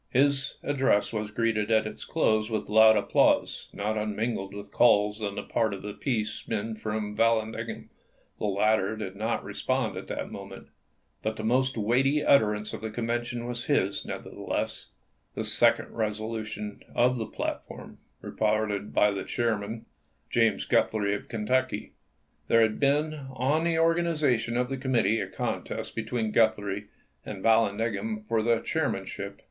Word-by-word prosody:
His 140 +1 +2
address 135 -7 +2
was 105 -1 -2
greeted 105 0 0
at 110 -1 +3
its - - -6
close 110 0 +1
with 110 -3 -3
loud 110 0 +7
applause, 100 - +2
not 105 +1 -2
unmingled 105 -1 -2
with 100 0 -9
calls 105 -2 +4
on 100 -1 -3
the - - -4
part 110 -3 0
of 95 - -10
the 105 0 -5
peace 110 -2 -2
men 110 0 -2
for 110 0 -4
Vallandigham. 110 +1 -1 0.5
The - - -2
latter 105 +1 +2
did 100 -3 -6
not 110 +3 -1
respond - - -1
at - - -7
that - - -4
moment, - - -9 0.5
but 110 0 -2
the 110 - -6
most 130 +3 +1
weighty 130 +7 +2
utterance 105 -5 +3
of - - -6
the 110 - -3
Convention 120 +1 -2
was 120 0 -4
his, 100 -9 +1
nevertheless - - -4 0.2
— - - -44
the - - -2
second - - +3
resolution 110 -1 -3
of 125 +1 +3
the 110 - -3
platform, - - -6 0.2
reported 105 -1 -1
by 105 - +5
the 100 -1 -3
chair 115 -2 0
man, 110 +3 -6 0.5
James - - +2
Guthrie 105 -2 +2
of 105 - -5
Kentucky. 130 +3 -1 0.5
There 115 - +5
had 110 -1 0
been 145 0 +1
on 145 +6 +1
the 165 -1 +2
organization 155 -8 +2
of 125 0 +1
the 135 +1 -3
committee 125 -4 +1
a - - -2
contest - - -4
be 115 - -2
tween 110 -1 -2
Guthrie 105 -2 +1 0.4
and 100 -3 -7
Vallandigham 115 - +1
for 115 - +1
the 115 0 +2
chairman 145 -12 -1
ship. 100 +1 -7
110 Hz, 160 wpm, -28 LUFS, 105-120 Hz, 0.5 s, loud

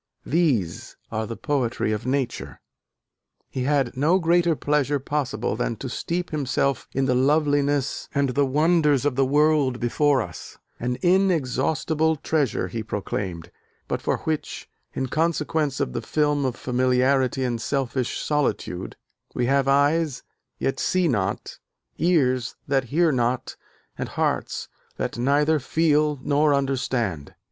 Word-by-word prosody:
These 130 - 0
are 110 0 -2
the 115 - -6
poetry 130 -7 -1
of 110 +3 -3
nature." 135 -1 -2 0.9
He 130 -1 -2
had 140 -3 +1
no 155 +8 +3
greater 170 -1 +3
pleasure 145 -1 +1
possible 140 0 -2
than - - -1
to - - -6
steep 175 +1 -3
himself 140 -2 0
in 135 0 0
"the 130 - +2
loveliness 145 +1 +1
and 140 -1 +2
the 140 +2 +1
wonders 150 -1 +3
of 145 -3 +1
the 135 0 +2
world 145 -3 +3
before 135 +2 +2
us: - - -10 0.2
an 125 +1 -2
inexhaustible 160 -3 +2
treasure," 145 - 0
he 115 +5 -4
proclaimed, 95 -5 -4 0.4
"but - - -2
for - - 0
which, 155 -1 -3 0.3
in 130 - -1
consequence 155 -1 0
of 60 - -1
the - - -2
film 150 -2 +1
of 125 -2 -1
familiarity 130 +1 +1
and 120 -3 -1
selfish 130 -2 -1
solitude, 140 -11 -2 0.4
we 125 - +1
have 135 +1 +2
eyes, 145 0 +2 0.3
yet 135 - -1
see 185 -1 +1
not, 100 -9 -2 0.4
ears 130 -8 +2
that 135 -2 +1
hear 160 +6 +2
not 125 -1 -1 0.4
and - - -3
hearts - - -1 0.3
that - - -3
neither 145 +4 +3
feel 150 0 +1
nor 145 0 +3
understand." 125 - -2
140 Hz, 135 wpm, -24 LUFS, 125-150 Hz, 0.9 s, no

